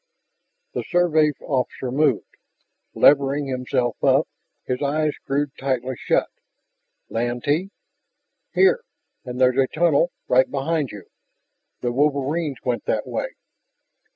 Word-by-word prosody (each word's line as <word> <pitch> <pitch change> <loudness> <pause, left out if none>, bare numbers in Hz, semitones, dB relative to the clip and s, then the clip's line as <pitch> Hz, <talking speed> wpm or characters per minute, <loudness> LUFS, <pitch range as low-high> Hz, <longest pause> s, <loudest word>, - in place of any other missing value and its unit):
The - - -2
Survey 160 -4 +3
officer 130 -1 -2
moved, 140 -3 +1 0.6
levering 140 0 +4
himself 125 -2 -2
up, - - +4 0.4
his 125 +1 -2
eyes 150 +1 +1
screwed 140 +1 -2
tightly 130 -1 -1
shut. - - +1 0.8
"Lantee?" 125 +10 -1 0.9
"Here. 470 +5 +4 0.4
And 125 0 -6
there's 130 0 +4
a 135 - +4
tunnel 170 +2 +2 0.2
right 130 +1 +4
behind 145 0 -1
you. 100 -3 -9 0.8
The 120 - 0
wolverines 145 +2 0
went 125 -2 -2
that - - 0
way...." - - -4
140 Hz, 110 wpm, -23 LUFS, 125-155 Hz, 0.9 s, levering